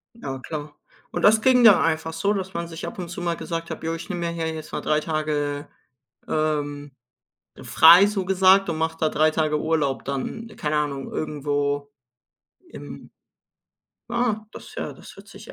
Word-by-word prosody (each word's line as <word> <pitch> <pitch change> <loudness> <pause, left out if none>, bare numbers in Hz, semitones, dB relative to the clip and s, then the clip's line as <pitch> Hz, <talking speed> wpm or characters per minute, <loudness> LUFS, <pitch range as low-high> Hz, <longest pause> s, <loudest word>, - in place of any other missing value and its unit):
Ja 135 - -6
klar. 150 +1 -7 0.4
Und - - -3
das 220 +1 +6
ging 250 0 +5
da 215 -4 +8
einfach 160 0 -1
so, 200 +6 0
dass 190 -2 -4
man 170 0 -3
sich 165 0 -7
ab - - -8
und 175 - -5
zu 180 0 -6
mal 170 -1 -1
gesagt 165 0 -5
hat: 160 - -7
„Jo, 165 0 -1
ich 165 +1 -9
nehme 175 -3 -3
mir - - -2
hier 165 -1 -3
jetzt 155 -1 -8
mal - - -3
3 150 0 +1
Tage, 150 -2 -2 0.6
ähm, 145 -2 -2 0.7
frei, 170 +5 +7
so 200 -3 -2
gesagt 190 +1 +4
und 160 - -3
mache 160 0 -1
da 160 - +2
3 155 +1 +2
Tage 155 -1 0
Urlaub 155 -4 0
dann, 140 - -4
keine 150 0 -1
Ahnung, 140 -3 -2
irgendwo 145 -1 -2 0.8
im“ - - -10 1.0
Ah, 235 -3 -1
das - - -11
ja, - - -4
das - - -14
hört - - -14
sich - - -12
160 Hz, 180 wpm, -24 LUFS, 150-180 Hz, 1.0 s, da